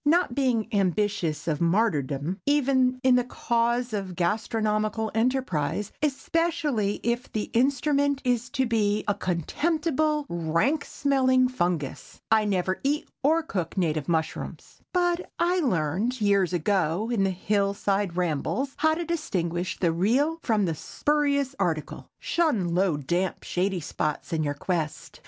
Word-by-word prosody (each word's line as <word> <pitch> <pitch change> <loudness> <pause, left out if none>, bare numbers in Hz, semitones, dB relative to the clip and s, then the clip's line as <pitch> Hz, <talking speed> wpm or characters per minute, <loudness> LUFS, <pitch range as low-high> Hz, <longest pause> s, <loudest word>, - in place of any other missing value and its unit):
Not 320 -2 +3
being 245 -5 +1
ambitious 195 -5 0
of 155 -1 -1
martyrdom, 170 - +1
even 260 -3 +3
in 255 -1 +5
the 250 - +2
cause 235 0 0
of 195 -3 -3
gastronomical 215 +3 0
enterprise, 225 - 0
especially 300 -7 0
if 235 +2 -1
the 215 - -3
instrument 280 +3 +2
is 245 -1 0
to 265 - 0
be 215 -3 +1
a 205 - +3
contemptible, 300 - 0
rank 170 - 0
smelling 260 -2 +2
fungus, 175 - -3
I 220 -1 +4
never 185 -2 0
eat 290 +3 0
or 320 +4 +3
cook 190 - -4
native 155 -5 0
mushrooms; 160 -2 -3
but 350 -1 0
I 355 +2 +2
learned, 215 - 0
years 200 -4 +2
ago, 185 +3 0
in 205 -4 +2
hill 200 +2 0
side 195 -3 -1
rambles, 180 - -1
how 315 0 +3
to 340 +1 -3
distinguish 180 - -2
the 170 -3 +2
real 255 - +1
from 215 -4 +1
the 165 - 0
spurious 280 - 0
article. 165 -5 -2
Shun 230 - 0
low, 180 -3 +2
damp, 175 +6 -1
shady 185 0 -1
spots 150 +2 -3
in 160 - +1
your 145 -1 -1
quest. 160 -1 -3
215 Hz, 135 wpm, -26 LUFS, 175-270 Hz, -, in